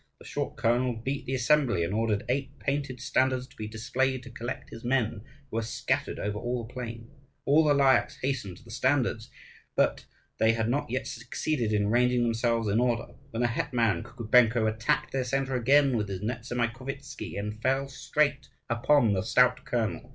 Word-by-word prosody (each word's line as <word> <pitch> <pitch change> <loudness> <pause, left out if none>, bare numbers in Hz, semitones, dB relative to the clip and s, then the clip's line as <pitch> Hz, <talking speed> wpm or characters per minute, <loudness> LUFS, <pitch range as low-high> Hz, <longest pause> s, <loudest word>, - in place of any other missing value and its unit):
The - - -16
short - - -4
colonel 120 +1 +1
beat 135 +5 -4
the 130 - 0
assembly, 125 - +3
and 85 +4 -2
ordered 110 -2 0
eight 135 +2 -2
painted 140 -3 -2
standards 130 0 +1
to - - -21
be 110 - -5
displayed 125 +4 -1
to 125 - -10
collect 125 +3 -6
his 115 - -9
men, 120 -4 0 0.3
who 110 - -2
were - - +1
scattered 115 - -2
over 105 0 -3
all 120 0 -2
the 115 - -14
plain. 115 -2 -6 0.4
All 150 +3 +5
the 150 -2 +4
Lyakhs 130 -3 +3
hastened 130 -9 -2
to - - -17
the 115 - -13
standards. 125 -2 0 0.5
But - - +1 0.3
they 110 0 +4
had 115 0 0
not 140 +1 -1
yet 130 +2 -2
succeeded 120 +1 -2
in 105 -1 +1
ranging 125 +1 +3
themselves 115 -1 +1
in 105 +3 +2
order, 120 -1 0 0.2
when 115 -1 -2
the - - +4
hetman 120 - 0
Kukubenko 115 0 +3
attacked 110 +8 0
their 135 -1 0
centre 135 +1 -1
again 135 +2 +4
with 105 -3 -1
his 95 -1 -4
Nezamaikovtzi 120 +4 -4
and 105 +2 -4
fell 135 +2 +1
straight 140 0 0 0.2
upon 120 -1 +4
the 95 - +1
stout - - +3
colonel. - - -2
120 Hz, 180 wpm, -28 LUFS, 115-135 Hz, 0.5 s, All